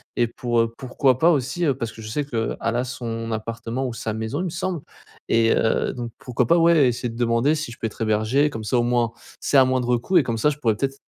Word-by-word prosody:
et 120 - +2
pour, 120 0 0
heu, 115 0 -1
pourquoi 130 -1 +1
pas 165 +4 +5
aussi, 140 +3 0
heu, 140 -4 +2
parce 115 -4 -3
que 110 - -12
je 110 - -8
sais 145 +7 -1
qu'elle 115 -5 -2
a 115 +2 0
son 115 -2 -5
appartement 115 +3 -4
ou 125 - -5
sa 110 -1 -4
maison, 110 +6 -3
il - - -2
me - - -2
semble 175 +1 -3 0.5
et 115 0 +4
heu, 115 - +1
donc 120 -2 -5
pourquoi 125 -1 -1
pas 170 - +5
ouais, 165 -4 +5
essayer 120 0 -1
de 115 - -9
demander 120 +5 +2
si 155 -4 -4
je - - -15
peux 115 - -1
être 110 - -11
hébergé 110 +7 +2
comme 110 -6 -6
ça 115 +4 +1
au - - +2
moins 120 -1 +1 0.3
c'est 145 - +2
à 130 - +7
moindre 125 -1 +1
coût 180 +10 +1
et 165 - +5
comme 115 -2 -2
ça, 150 - +3
je 150 - -3
pourrais 115 -6 +1
peut-être 135 +2 -2
120 Hz, 265 wpm, -23 LUFS, 115-135 Hz, 0.5 s, à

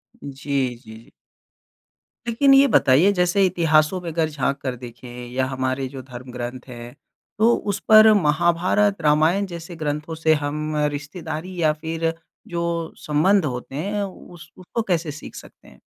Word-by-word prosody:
जी, 140 -2 -3
जी, 110 -3 -13
जी। 115 - -16 1.2
लेकिन 275 +4 +4
ये 275 +1 +7
बताइए 145 - +4
जैसे 180 +2 +3
इतिहासों 165 -1 +2
में 170 - -5
अगर 160 -1 0
झाँक 140 -1 -1
कर 130 -2 -3
देखें 120 +1 -10 0.2
या 130 +1 0
हमारे 130 0 -2
जो 135 -1 -8
धर्म 125 0 -10
ग्रंथ 125 +1 -6
हैं। 120 +1 -10 0.4
तो 230 +2 +5
उस 200 -1 -3
पर 215 0 +9
महाभारत, 175 +4 +2
रामायण 155 +6 +3
जैसे 170 -1 -8
ग्रंथों 155 0 -4
से 160 0 +3
हम 150 +1 -3 0.2
रिश्तेदारी 155 +4 -6
या 155 -1 +4
फ़िर 165 +1 -2 0.3
जो 170 -1 -3
संबंध 160 +5 +3
होते 125 0 -5
हैं 200 +7 -2
उस 175 -4 -10
उसको 185 +5 -4
कैसे 165 -3 0
सीख 145 - -10
सकते - - -13
हैं? - - -18
155 Hz, 155 wpm, -22 LUFS, 135-180 Hz, 1.2 s, पर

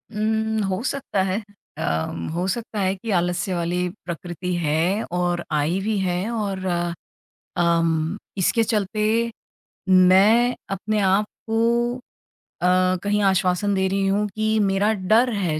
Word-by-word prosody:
उम्म, 220 0 0
हो 195 +1 -1
सकता 265 -7 -1
है 190 +3 -1 0.4
अ, - - -5 0.5
हो 175 +2 -1
सकता 220 +1 -3
है 190 0 +1
कि 210 +4 -8
आलस्य 175 0 0
वाली 175 +1 -1 0.2
प्रकृति 175 +1 -4
है 170 +6 +1
और 175 -1 0
आई 155 +5 +1
भी 215 +1 -1
है। 185 +2 -1
और 200 -4 -3 0.9
अम 165 0 +1 0.2
इसके 210 +5 +2
चलते 210 -1 -1 0.9
मैं 195 +7 +5
अपने 215 +2 -1
आप 195 +1 +3 0.2
को 235 +2 +1 0.7
अ, 185 +1 +3
कहीं 205 +1 +1
आश्वासन 190 +1 +2
दे 190 0 +1
रही 195 +1 0
हूँ 205 +2 +1
कि 215 0 +1
मेरा 200 +1 +2
डर 220 +5 +3
है 175 -7 -1
195 Hz, 135 wpm, -23 LUFS, 180-215 Hz, 0.9 s, मैं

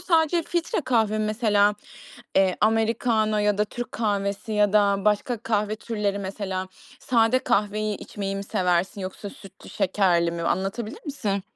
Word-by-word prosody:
sadece 330 -1 +2
filtre 340 +1 -1
kahve 220 -5 +1
mesela, 210 -1 +2 0.6
eee, 190 -1 +3
americano 220 0 +2
ya 210 -1 +1
da 210 - +3
Türk 240 +2 -7
kahvesi 205 -1 -2
ya 210 -1 +3
da 200 -2 +3
başka 210 +3 +1
kahve 215 -1 -1
türleri 210 -3 -2
mesela 190 -1 -4 0.3
sade 235 0 +3
kahveyi 215 -3 0
içmeyi 195 -1 -5
mi 195 - -4
seversin 180 +1 0
yoksa 190 +2 -6
sütlü 195 0 -14
şekerli 175 -3 +2
mi? 170 0 -4
Anlatabilir 195 - -2
misin? 205 -9 -2
210 Hz, 140 wpm, -25 LUFS, 195-225 Hz, 0.6 s, eee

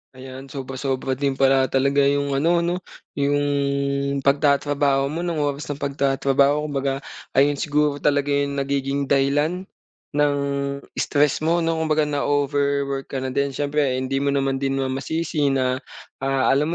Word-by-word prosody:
Ayan, 130 +1 -10
sobra-sobra 135 -1 -3
din 135 0 -1
pala 135 -1 +3
talaga 140 +1 +3
'yong 140 0 +1
ano 165 +5 +3
'no? 170 +1 0 0.4
'Yong 140 -1 0
pagtatrabaho 140 0 +2
mo, 160 +5 -4
no'ng 170 -3 -2
oras 145 0 -2
ng 145 - -6
pagtatrabaho. 140 +1 +1
Kumbaga 135 -1 -1 0.3
ayon 145 +2 +3
siguro 150 0 +1
talaga 145 0 +1
'yong 140 0 0
nagiging 140 0 -1
dahilan 145 +6 +1 0.5
ng 145 -1 +2 0.6
stress 145 -1 +2
mo 165 +2 +1
'no? 165 0 0
Kumbaga 155 -1 +2
na-overwork 140 -1 0
ka 135 -1 -4
na 130 - -3
din. 140 0 -1
S'yempre 145 -2 0
hindi 130 +1 -1
mo 140 0 0
naman 135 -1 0
din 135 0 -1
masisi 150 +3 -1
na, 130 -1 +1 0.4
ah, 135 -1 +1
alam 140 +3 +2
140 Hz, 145 wpm, -22 LUFS, 135-145 Hz, 0.6 s, pala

